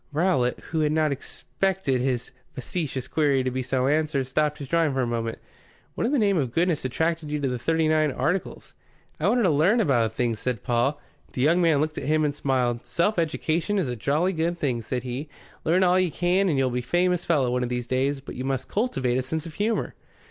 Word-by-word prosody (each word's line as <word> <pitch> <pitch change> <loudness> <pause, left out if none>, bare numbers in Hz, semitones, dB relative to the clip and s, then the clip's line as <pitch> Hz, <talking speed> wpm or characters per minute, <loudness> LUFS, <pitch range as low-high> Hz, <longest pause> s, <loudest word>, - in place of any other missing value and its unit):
Rowlatt, 145 -6 +1
who 160 - 0
had 150 -1 +2
not 155 -1 +2
expected 140 0 -2
his 125 -2 -1 0.2
facetious 135 -2 -4
query 140 -4 +2
to 130 - -1
be 130 +1 -2
so 130 0 0
answered, 150 -1 +1
stopped 150 +3 0
his 140 - -7
drawing 165 -1 +2
for 130 - +1
a - - +1
moment. 115 -1 -2 0.6
"What - - -1
in - - -1
the 295 - +2
name 200 -5 +3
of 130 -5 -1
goodness 170 +2 +1
attracted 160 +4 -1
you 150 0 -1
to 140 - 0
the 125 -1 -2
Thirty 160 +4 +1
nine 155 -1 +2
Articles?" 180 +8 -2 0.5
"I 160 - +1
wanted 240 +3 +3
to 185 - +4
learn 170 +11 +3
about 125 - +2
things," 115 -3 0
said 125 -3 -3
Paul. 125 +4 +1 0.3
The 125 - -2
young 170 +5 +4
man 160 -4 +3
looked 155 0 -2
at - - -6
him 155 +1 +2
and 145 - 0
smiled. 125 -4 0
"Self 180 +3 0
education 165 +4 0
is 185 -7 0
a 125 - -3
jolly 155 - 0
good 170 +1 -1
thing," 125 -7 -1
said 125 +2 -3
he. 130 +4 -5 0.4
"Learn 175 +4 +3
all 180 0 +4
you 185 -1 +2
can, 180 +4 +1
and 150 - +1
you'll 130 -1 +1
be 125 - -1
a - - -3
famous 175 +6 +1
fellow 140 -7 +1
one 125 0 0
of 125 - -1
these 125 -1 -2
days. 135 +3 0
But 140 - -9
you 130 - -5
must 135 -1 -2
cultivate 130 - 0
a - - +1
sense 155 +5 -4
of 165 - -8
humour." 215 +6 -1
150 Hz, 230 wpm, -25 LUFS, 130-170 Hz, 0.6 s, to